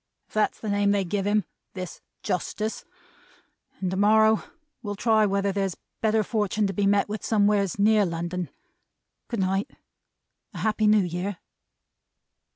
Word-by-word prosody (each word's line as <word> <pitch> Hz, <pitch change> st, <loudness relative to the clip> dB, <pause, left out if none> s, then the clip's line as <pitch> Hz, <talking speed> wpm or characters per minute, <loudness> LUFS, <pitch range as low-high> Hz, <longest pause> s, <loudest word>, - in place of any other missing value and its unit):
"If -, -, -27 dB
that's 215 Hz, 0 st, +1 dB
the 215 Hz, -, -4 dB
name 205 Hz, 0 st, +2 dB
they 200 Hz, -1 st, +2 dB
give 195 Hz, +2 st, -1 dB
him. 210 Hz, -2 st, +2 dB, 0.3 s
This 185 Hz, -2 st, -6 dB, 0.2 s
Justice. 215 Hz, +4 st, -3 dB, 0.9 s
And 185 Hz, -2 st, -2 dB
to 190 Hz, -, -2 dB
morrow 220 Hz, +2 st, +5 dB, 0.4 s
will 205 Hz, -3 st, -4 dB
try 215 Hz, 0 st, +3 dB
whether 200 Hz, 0 st, +1 dB
there's 195 Hz, -2 st, -2 dB, 0.2 s
better 220 Hz, -1 st, +2 dB
fortun' 210 Hz, -1 st, 0 dB
to 195 Hz, -, -1 dB
be 200 Hz, +2 st, +1 dB
met 200 Hz, 0 st, +3 dB
with 210 Hz, +1 st, -5 dB
somewheres 205 Hz, -3 st, +2 dB
near 210 Hz, +1 st, +4 dB
London. 175 Hz, 0 st, -3 dB, 0.8 s
Goodnight. 195 Hz, -3 st, -1 dB, 0.9 s
A -, -, -5 dB
Happy 215 Hz, 0 st, +1 dB
New 210 Hz, -1 st, +5 dB
Year!" 180 Hz, +2 st, -3 dB
205 Hz, 145 wpm, -26 LUFS, 195-215 Hz, 0.9 s, morrow